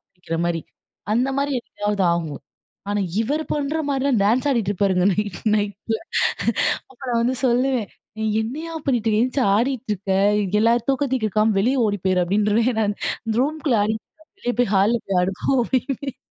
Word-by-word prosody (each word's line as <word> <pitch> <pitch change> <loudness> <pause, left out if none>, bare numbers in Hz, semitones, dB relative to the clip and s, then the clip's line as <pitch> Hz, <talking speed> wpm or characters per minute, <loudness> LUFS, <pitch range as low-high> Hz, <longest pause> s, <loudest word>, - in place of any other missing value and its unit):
புடிக்கிற 180 -3 -6
மாரி, 170 -1 0 0.5
அந்த 245 +4 +2
மாரி 280 0 0
எப்பயாவது 205 -3 -2
ஆகும். 160 -4 -4 0.5
ஆனா 205 0 0 0.2
இவர் 290 +7 0
பண்ற 295 +2 -1
மாரில்லாம் 270 -5 +1
டான்ஸ் 235 +7 +2
ஆடிட்டு 230 -7 +1
இருப்பாருங்க 190 -2 +1
நைட் 205 -1 -2 0.2
நைட்ல. 205 +2 -1 0.9
அப்ப 260 - -19
நா 245 - 0
வந்து 250 +2 +1
சொல்லுவேன், 250 -2 +1 0.3
"நீ 220 - -2 0.2
என்னைய்யா 310 +9 -5
பண்ணீட்டுருக்க? 225 -4 +2
எந்திச்சு 255 +1 0
ஆடிட்ருக்க? 220 -5 -2 0.5
எல்லார் 230 +1 +2
தூக்கத்தையும் 265 -2 0
கெடுக்காம, 215 0 +2
வெளிய 250 +4 +2
ஓடி 205 -1 -1
போயிரு." 185 -1 +3
அப்படீன்றுவேன் 210 +5 +1
நான். 205 -1 +1 0.3
இந்த 220 - 0
ரூம்குள்ள 295 -4 0
ஆடிட்ருப்பாரு, 220 +9 -5
"வெளிய 245 - -1
போய் 240 -5 +1
ஹால்ல 205 +5 +3
போய் 190 -2 +1
ஆடு 185 +2 0
போ." - - -2
அப்படீம்பேன். 270 +2 -2
225 Hz, 155 wpm, -22 LUFS, 205-260 Hz, 0.9 s, போயிரு